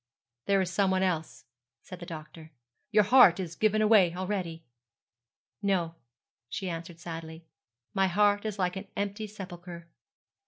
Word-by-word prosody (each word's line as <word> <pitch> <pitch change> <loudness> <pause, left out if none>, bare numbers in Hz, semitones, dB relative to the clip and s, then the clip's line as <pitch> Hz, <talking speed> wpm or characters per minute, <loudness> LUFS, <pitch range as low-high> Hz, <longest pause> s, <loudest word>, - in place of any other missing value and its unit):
'There 195 -1 +3
is 180 -1 -2
some 195 0 +2
one 190 0 +2
else,' 160 -7 -2 0.4
said 185 - -10
the 175 - -9
doctor. 160 0 -9 0.4
'Your 210 -1 +5
heart 200 -5 +7
is 175 -3 -4
given 215 +2 +2
away 200 -6 +5
already.' 180 -3 -3 1.0
'No,' 185 -5 0 0.6
she 190 -2 -3
answered 165 0 -7
sadly; 165 -1 -8 0.5
'my 195 -1 +3
heart 205 +2 +3
is 215 -2 -4
like 180 -1 0
an 195 +1 -6
empty 205 +2 -3
sepulchre.' 180 -4 -9
185 Hz, 145 wpm, -29 LUFS, 170-200 Hz, 1.0 s, heart